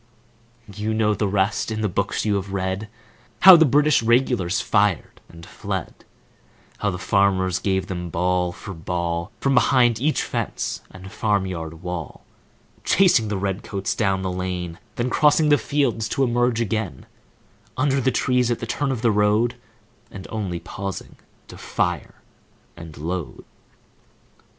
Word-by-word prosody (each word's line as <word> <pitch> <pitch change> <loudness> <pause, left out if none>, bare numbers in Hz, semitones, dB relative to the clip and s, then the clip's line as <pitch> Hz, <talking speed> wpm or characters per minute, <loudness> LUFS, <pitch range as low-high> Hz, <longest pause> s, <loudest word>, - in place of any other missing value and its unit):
You 105 +2 -2
know 110 -1 +2
the 105 0 -1
rest. 100 +2 0
In 110 -1 -3
the 105 - +1
books 90 - -2
you 105 - +1
have 100 -1 -3
read, 95 +2 -2 0.5
How 190 -1 +11
the 160 -1 +6
British 145 +1 +3
Regulars 115 -5 +2
fired 100 -4 0
and 85 0 -13
fled,— - - -6 0.7
How 105 - 0
the 90 - -3
farmers 95 -1 +1
gave 95 -2 0
them 90 -3 -5
ball 90 +1 0
for 95 +3 -9
ball, 85 0 -3
From 135 - +1
behind 120 -2 +3
each 150 +3 +1
fence - - -3
and 95 0 -11
farm 105 -2 0
yard 80 -2 -6
wall, 90 -4 -6 0.6
Chasing 175 - +4
the 105 -1 -2
red 95 +1 -2
coats 100 -2 -3
down 95 -3 0
the 95 - -2
lane, 90 -2 -4 0.2
Then 120 +1 -2
crossing 150 0 +4
the 145 - +5
fields 125 -7 0
to 135 - 0
emerge 120 -1 +1
again 110 -4 -3 0.7
Under 135 0 +1
the 130 - +2
trees 125 -2 +1
at 120 - 0
the - - -5
turn 140 +4 -1
of 125 -3 -4
the 115 - +4
road, 105 +3 +2 0.6
And 95 -1 -9
only 95 -6 -3
pausing 95 +1 -7 0.3
to - - -12
fire 90 -4 -2 0.6
and 85 -2 -11
load. 85 +3 -5
100 Hz, 155 wpm, -22 LUFS, 90-120 Hz, 0.7 s, How